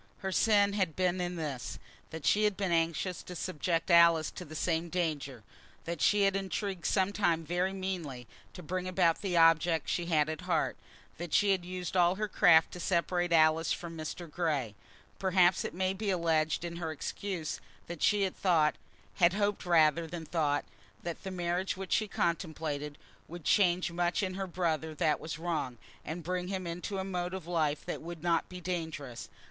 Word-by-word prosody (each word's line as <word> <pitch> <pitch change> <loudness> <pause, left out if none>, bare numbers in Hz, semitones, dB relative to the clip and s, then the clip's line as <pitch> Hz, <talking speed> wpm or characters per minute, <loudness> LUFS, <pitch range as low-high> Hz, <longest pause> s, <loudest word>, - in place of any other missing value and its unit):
Her 190 - -4
sin 205 0 +4
had 185 -6 0
been 180 0 +1
in 180 0 -2
this, 145 -7 -4 0.3
that 160 -2 -7
she 205 +8 +4
had 210 -2 +1
been 195 -3 -1
anxious 170 +2 0
to 180 - -9
subject 170 +1 -1
Alice 170 -2 +6
to - - -8
the 155 - -10
same 165 +1 -1
danger, 150 -9 -2 0.4
that 170 -2 -4
she 205 -1 +4
had 195 -1 +3
intrigued, 195 -1 -2
sometimes 185 -5 +1
very 180 +3 0
meanly, 180 -10 -4 0.3
to 180 - -10
bring 185 +3 -3
about 180 -3 +2
the 185 -4 0
object 165 -1 +4
which - - -4
she 175 - -1
had 155 -3 +3
at 155 +3 -4
heart, 175 -3 0 0.4
that 175 -2 -2
she 205 -1 +4
had 190 -2 +1
used 180 0 -5
all 175 0 +4
her 215 +2 -2
craft 175 -5 +5
to 180 - -8
separate 175 0 0
Alice 160 0 +4
from 170 -1 -4
Mr. 160 +2 -6
Grey. 150 - -1 0.5
Perhaps 185 -1 +3
it - - -4
may 185 +1 0
be 200 +1 -3
alleged 165 -3 +1
in 170 0 -5
her 165 -2 -3
excuse 170 +1 -4 0.2
that 170 -2 -8
she 205 -1 +3
had 190 - -1
thought, 165 -5 +2 0.4
had 175 -2 +5
hoped 205 -2 -1
rather 165 -1 +4
than 165 0 -6
thought, 150 -4 0 0.4
that 170 -1 -5
the 190 - -5
marriage 180 +1 -2
which 190 -1 -7
she 215 - +2
contemplated 160 -5 -2 0.3
would 175 0 -9
change 180 -2 +3
much 175 +3 0
in 185 -1 -2
her 190 0 -3
brother 160 -3 -1
that 150 0 +1
was 155 -1 -5
wrong, 155 -7 -3 0.3
and 165 +2 -5
bring 180 +2 -2
him 190 -1 -3
into 175 +4 -4
a 190 - -2
mode 180 -1 -3
of 185 -4 -7
life 155 -4 0
that - - -4
would 170 0 -8
not 170 -1 +1
be 180 - -8
dangerous. 160 -8 -5
175 Hz, 190 wpm, -31 LUFS, 160-185 Hz, 0.5 s, Alice